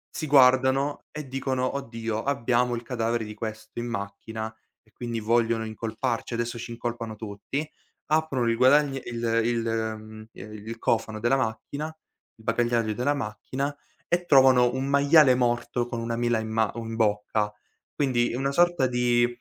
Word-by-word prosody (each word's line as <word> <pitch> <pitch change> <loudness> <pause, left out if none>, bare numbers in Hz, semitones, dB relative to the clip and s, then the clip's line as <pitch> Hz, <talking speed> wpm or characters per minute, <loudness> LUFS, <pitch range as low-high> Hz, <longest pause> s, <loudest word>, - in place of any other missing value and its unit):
si 155 - -3
guardano 130 +1 +4
e 150 -2 -7
dicono: 130 0 -1
"Oddio, 115 -4 -3
abbiamo 125 -2 +1
il 120 - -6
cadavere 115 -1 -1
di 105 0 -7
questo 110 0 -6
in 120 - -3
macchina 110 +1 -5 0.3
e 110 - -29
quindi 120 -2 -4
vogliono 115 0 +1
incolparci, 115 +2 -3
adesso 120 0 -3
ci 120 - -7
incolpano 115 -1 -4
tutti," 110 +8 -5 0.4
aprono 155 -6 +1
il 115 - +2
guadagn 135 +4 +5
il 115 -1 0
il, 115 0 0
mhmm, 110 -1 -4
ehm, 105 +2 -10
il 115 +1 -6
cofano 110 -1 0
della 120 +4 +2
macchina, 135 +4 -3
il 160 -7 -19
bagagliaio 115 -1 +1
della 125 +6 0
macchina 135 +3 -4 0.3
e 175 +1 0
trovano 130 -4 +6
un 130 +1 -2
maiale 140 0 +6
morto 120 -1 0
con 120 -1 -4
una 115 0 -2
mela 120 0 +1
in 110 0 -3
ma 110 -1 +1
un 115 -1 -5
bocca. 105 -1 +1 0.4
Quindi 120 -4 +1
una 135 +2 0
sorta 175 -1 +3
di, 120 -1 +2
120 Hz, 160 wpm, -26 LUFS, 110-130 Hz, 0.4 s, trovano